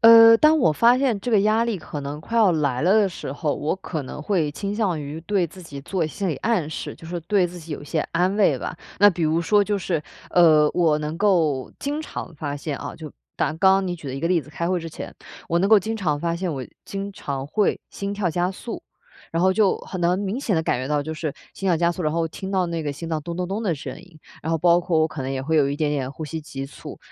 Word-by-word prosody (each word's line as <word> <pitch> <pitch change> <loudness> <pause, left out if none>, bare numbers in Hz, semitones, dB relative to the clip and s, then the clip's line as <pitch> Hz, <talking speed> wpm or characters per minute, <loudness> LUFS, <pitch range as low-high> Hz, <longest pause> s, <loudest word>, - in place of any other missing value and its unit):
呃， 230 0 +9
当 310 +4 +5
我 160 - +4
发 235 +10 +5
现 255 -7 +1
这 245 - -3
个 210 -3 +5
压 215 +3 +3
力 225 -5 -1
可 150 -2 -6
能 145 +2 -5
快 230 +7 -2
要 205 -6 +5
来 145 -4 0
了 185 +4 +4
的 210 -2 +4
时 170 -6 -6
候， 145 0 -1
我 155 +4 -1
可 165 -5 -5
能 140 +2 -7
会 165 -5 +1
倾 200 +6 -3
向 195 -8 0
于 145 +2 -6
对 190 -1 +1
自 185 +3 -13
己 140 -4 -8
做 170 +2 -1
心 190 +4 -3
理 150 - -1
暗 190 -7 0
示， - - -5
就 165 - -13
说 175 +1 -4
对 180 +2 +2
自 175 +1 -9
己 160 -2 -8
有 145 - -6
一 - - -9
些 155 +1 -1
安 180 +4 +1
慰 205 - +3
吧。 - - -5 0.2
那 205 +1 +8
比 170 -1 -4
如 160 +2 +2
说 205 +4 +4
就 205 0 0
是， 170 -4 -1 0.3
呃， 155 -4 +6
我 160 -4 +3
能 150 +2 -4
够 165 -10 +2
经 290 +2 -2
常 180 - -7
发 145 -1 -4
现 145 0 -4
啊， - - -6
就 160 -2 -8 0.3
拿 - - +2
刚 160 - -10
刚 190 +1 +4
你 175 - -2
举 155 - -11
的 130 - -4
一 135 - -5
个 165 - 0
例 175 -3 +3
子， 150 - -14
开 170 +3 -2
会 185 -1 +1
之 165 - -6
前， 155 - -8 0.3
我 170 - +2
能 195 +3 +2
够 220 -1 +8
经 220 +4 -3
常 155 -8 0
发 170 +1 0
现 180 -1 -2
我 130 - -4 0.2
经 200 0 -5
常 140 -5 -4
会 205 +7 +1
心 200 0 -4
跳 195 -4 0
加 175 +3 0
速。 225 +5 -7 0.5
然 165 - -1
后 190 - +5
就 205 -1 +3
很 185 - -6
能 175 +2 +2
明 205 +6 -2
显 205 - 0
地 160 - +1
感 130 - 0
觉 130 - -4
到 150 -1 +1
就 160 +2 -5
是 155 -1 -3 0.2
心 195 - -3
跳 170 - +4
加 170 +1 +2
速， 180 - -5
然 155 - +1
后 165 0 0
听 190 +4 -7
到 190 -2 +2
那 170 -1 -3
个 145 - -2
心 155 +4 -7
脏 155 -2 -2
咚 170 +2 -5
咚 180 0 -2
咚 200 +5 -3
的 180 -6 +1
声 140 - -7
音。 170 -4 -17 0.2
然 160 - -2
后 165 - +2
包 175 +2 +4
括 170 -2 +1
我 155 - +4
可 155 -2 -7
能 130 - -3
也 135 -1 -2
会 160 +3 0
有 140 -2 +4
一 140 - -2
点 150 -1 0
点 135 -3 -2
呼 155 +2 -7
吸 160 +1 -5
急 135 -2 -6
促。 140 - -10
170 Hz, 305 characters per minute, -23 LUFS, 150-195 Hz, 0.5 s, 呃